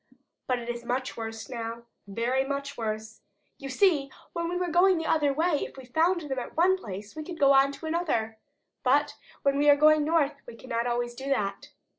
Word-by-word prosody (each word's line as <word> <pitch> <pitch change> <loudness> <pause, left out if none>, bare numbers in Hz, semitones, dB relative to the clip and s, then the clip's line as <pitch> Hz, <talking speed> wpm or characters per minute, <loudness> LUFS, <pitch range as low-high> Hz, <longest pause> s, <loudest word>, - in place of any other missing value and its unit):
But 255 - +1
it 235 -1 -7
is 240 0 -4
much 255 +2 -2
worse 225 -1 -6
now, 230 -2 -5 0.2
very 235 +6 0
much 280 +1 -4
worse. 220 -1 -5 0.4
You 275 -2 -6
see, 290 -2 +2 0.2
when 335 -1 -2
we 355 - -2
were 360 -1 -1
going 360 +2 +5
the 325 - -3
other 295 -3 +2
way, 315 +1 +1
if - - -8
we 265 - -10
found 330 +8 +2
them 270 -4 -3
at 245 - -8
one 365 +3 +5
place 205 - -8
we 310 - -5
could 335 +1 -7
go 275 -1 +6
on 275 +1 +5
to 320 - -9
another, 295 -10 -1 0.4
but 290 +3 +2 0.3
when 275 0 +2
we 295 0 +4
are 290 - +8
going 305 +1 +5
north 295 -3 +1
we 240 - -9
cannot 235 -1 -3
always 240 0 -1
do 270 +3 -6
that. 200 -7 -1
275 Hz, 210 wpm, -28 LUFS, 235-310 Hz, 0.4 s, are